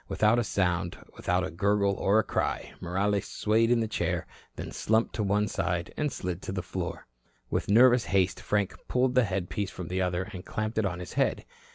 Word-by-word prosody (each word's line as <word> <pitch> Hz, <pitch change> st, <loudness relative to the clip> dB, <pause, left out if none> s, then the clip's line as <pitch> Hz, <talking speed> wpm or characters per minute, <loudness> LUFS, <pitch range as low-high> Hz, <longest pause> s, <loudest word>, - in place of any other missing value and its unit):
Without 110 Hz, +2 st, +3 dB
a -, -, +2 dB
sound, 90 Hz, -4 st, 0 dB, 0.2 s
without 90 Hz, +1 st, 0 dB
a 95 Hz, -, -5 dB
gurgle 100 Hz, +3 st, +2 dB
or 100 Hz, +2 st, +2 dB
a 110 Hz, -, +4 dB
cry, -, -, -2 dB
Morales 100 Hz, +3 st, 0 dB
swayed 110 Hz, +2 st, +2 dB
in 120 Hz, -1 st, +3 dB
the 110 Hz, -, 0 dB
chair, 110 Hz, -, -1 dB, 0.3 s
then -, -, -6 dB
slumped 110 Hz, +1 st, +1 dB
to 110 Hz, -, -2 dB
one 105 Hz, +1 st, +2 dB
side 85 Hz, -1 st, -2 dB
and 150 Hz, -2 st, -1 dB
slid 90 Hz, -1 st, -4 dB
to -, -, -5 dB
the 95 Hz, -2 st, -3 dB
floor. 90 Hz, 0 st, -5 dB, 0.5 s
With -, -, -1 dB
nervous 120 Hz, +3 st, +6 dB
haste 95 Hz, -1 st, +1 dB
Frank 105 Hz, -2 st, 0 dB
pulled 125 Hz, 0 st, +2 dB
the 125 Hz, -2 st, +4 dB
headpiece 95 Hz, +1 st, -2 dB
from 90 Hz, -3 st, -7 dB
the 95 Hz, +1 st, -1 dB
other 90 Hz, 0 st, 0 dB
and 90 Hz, -1 st, -7 dB
clamped 110 Hz, +1 st, -2 dB
it 105 Hz, -, +2 dB
on 90 Hz, -2 st, -4 dB
his 90 Hz, -, -7 dB
head. -, -, +1 dB
100 Hz, 205 wpm, -28 LUFS, 90-110 Hz, 0.5 s, nervous